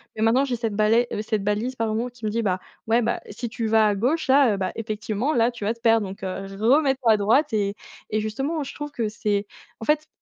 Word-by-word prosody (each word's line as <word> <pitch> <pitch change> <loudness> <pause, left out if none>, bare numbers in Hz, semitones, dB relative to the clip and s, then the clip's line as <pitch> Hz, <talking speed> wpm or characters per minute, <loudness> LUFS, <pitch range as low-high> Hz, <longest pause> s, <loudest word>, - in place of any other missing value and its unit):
et 220 - -4
maintenant 230 +5 +4
j'ai 255 -3 -1
cette 225 -3 -2
balais 220 +3 +3
heu, 210 - -2
cette 215 -2 -2
balise 215 +5 -1
pardon, 225 +1 -1
qui 240 -2 -10
me - - +1
dit: 230 +2 0
"bah, 185 -4 0 0.3
ouais 230 +2 +3
bah, 235 +1 -1
si 225 +4 -5
tu 225 0 -3
vas 220 0 +4
à 205 - +1
gauche 265 +11 0
là, 265 -4 +5
heu, - - -5
bah, 185 -1 -2
effectivement 220 +4 -2
là, 235 -3 +3
tu 235 -3 -9
vas 210 +3 +1
te 230 - -21
perdre 225 -2 +3
donc 190 0 -9
heu, 190 +1 -4
remets 270 +5 +4
toi 235 -4 +3
droite"». 230 +7 +2
Et 200 -1 0 0.3
et 215 - 0
justement 270 +9 -2
je 270 - -8
trouve 295 0 -6
que 230 -5 -2
c'est 205 -1 -1 0.3
en 225 - -6
fait, 305 +2 +1
225 Hz, 250 wpm, -24 LUFS, 210-250 Hz, 0.3 s, là